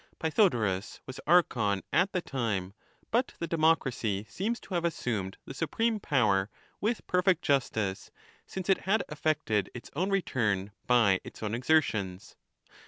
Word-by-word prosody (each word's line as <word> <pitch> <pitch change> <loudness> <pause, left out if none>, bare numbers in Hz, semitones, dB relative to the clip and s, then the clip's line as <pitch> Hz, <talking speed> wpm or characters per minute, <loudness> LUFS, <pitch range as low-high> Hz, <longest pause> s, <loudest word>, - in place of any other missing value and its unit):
Pythodorus 115 - +1
was 130 0 -8
Archon 115 - +3
at 185 +2 +3
the 180 -2 -1
time, 105 -8 -2 0.4
but 245 +3 +1
the 170 - -3
democracy 135 -11 +1
seems 205 - -2
to - - -9
have 170 -1 0
assumed 110 - -2
the - - -7
supreme 220 +10 0
power 105 - +2 0.3
with 220 +2 -1
perfect 180 -1 +2
justice, 110 -8 0 0.4
since 190 -2 -5
it 195 - +4
had 220 +3 +3
effected 150 -10 0
its 120 - -9
own 185 +6 0
return 110 - 0 0.2
by 115 -7 +4
its - - -11
2 - - -3
own 105 - -2
exertions. 115 -8 0
135 Hz, 145 wpm, -29 LUFS, -, 0.4 s, it